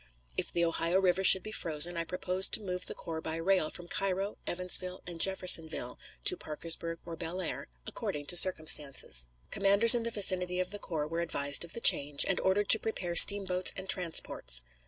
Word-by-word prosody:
If - - -3
the 170 0 -1
Ohio 170 +2 -2
River 190 0 -1
should 190 -1 +8
be 215 - -10
frozen, 170 -3 +1
I 165 0 -5
proposed 180 +2 -2
to - - +4
move 180 -1 -4
the - - -4
corps 160 -1 -8
by 160 0 -7
rail 165 -1 -1
from 175 - -12
Cairo, 195 +2 -4
Evansville, 180 +1 -3
and 170 -2 -8
Jeffersonville 180 -4 +2 0.3
to 390 -3 +3
Parkersburg 165 - -3
or 170 -1 -9
Bellaire, 170 +2 -6 0.2
according 145 -1 -7
to 175 - -5
circumstances. 150 - -1 0.2
Commanders 200 +3 +5
in 240 - 0
the 230 - -3
vicinity 185 -4 +1
of 185 0 -4
the 205 - -7
corps 155 -6 -6
were 165 +2 -5
advised 145 -3 -1
of 170 - -5
the - - -7
change, 145 -6 +3
and 190 - -2
ordered 195 +2 -2
to 220 - +8
prepare 180 -6 -6
steamboats 190 -1 +6
and 190 0 -10
transports. 160 - 0
180 Hz, 185 wpm, -28 LUFS, 165-190 Hz, 0.3 s, should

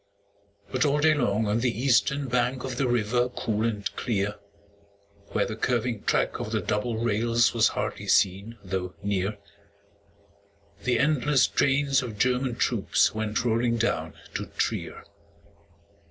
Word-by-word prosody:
But 130 +3 +1
all 145 -1 +2
day 155 +1 +4
long 110 -6 +1
on 105 +2 +1
the 120 -1 -1
eastern 135 +2 +2
bank 125 +1 0
Of 130 -2 -4
the 135 - +1
river 120 +1 +1
cool 110 -3 -2
and 105 -3 -2
clear, 105 -4 -2 0.9
Where - - 0
the 110 - -5
curving 120 -1 -1
track - - +1
of - - -5
the - - +1
double 110 +2 -2
rails 115 +1 +2
Was 115 -2 +4
hardly - - -4
seen 100 +5 +2
though 90 -1 -4
near, 100 +1 -1 1.5
The 125 -1 +2
endless 145 -2 +3
trains 135 -1 +2
of 115 -5 -6
German 125 +1 +1
troops - - +1
Went 110 +2 -2
rolling 115 0 +1
down 115 +1 -1 0.2
to - - -4
Trier. - - -3
120 Hz, 140 wpm, -26 LUFS, 105-125 Hz, 1.5 s, day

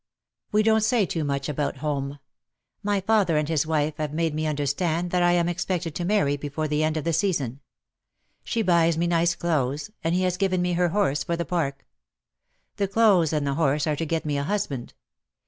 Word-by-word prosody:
"We 215 +1 +3
don't 220 0 +4
say 220 -1 +2
too 165 -2 -2
much 140 -1 -2
about 150 -1 -2
home. 140 -1 -3 0.6
My 205 -1 0
father 195 -5 +2
and 150 -1 0
his 160 -1 +1
Nvife 155 -1 0
have 155 -1 -3
made 165 -1 0
me 155 +1 -1
understand 155 +4 -1
that 180 - +2
I 175 0 +4
am 170 -1 +2
expected 175 -1 -2
to 175 - -3
marry 175 -8 +2
before 145 +2 -3
the 150 +1 0
end 155 0 0
of 155 - -2
the 165 - 0
season. 150 - 0 0.8
She 230 -2 -1
buys 170 -3 +3
me 170 - +1
nice 170 0 +2
clothes, 150 +1 -1
and 165 +2 +1
he 185 - +1
has 180 -1 0
given 185 -1 +1
me 180 0 0
her 175 0 +2
horse 160 -7 +1
for 170 +3 -2
the 170 - -2
Park. 140 -6 -2 0.9
The 200 -1 +1
clothes 195 -6 +4
and 150 -2 0
the 140 - 0
horse 145 -1 +1
are 155 -2 0
to 165 - -3
get 165 0 -1
me 145 -2 -1
a - - -1
husband. 150 -8 -3
165 Hz, 210 wpm, -25 LUFS, 150-180 Hz, 0.9 s, don't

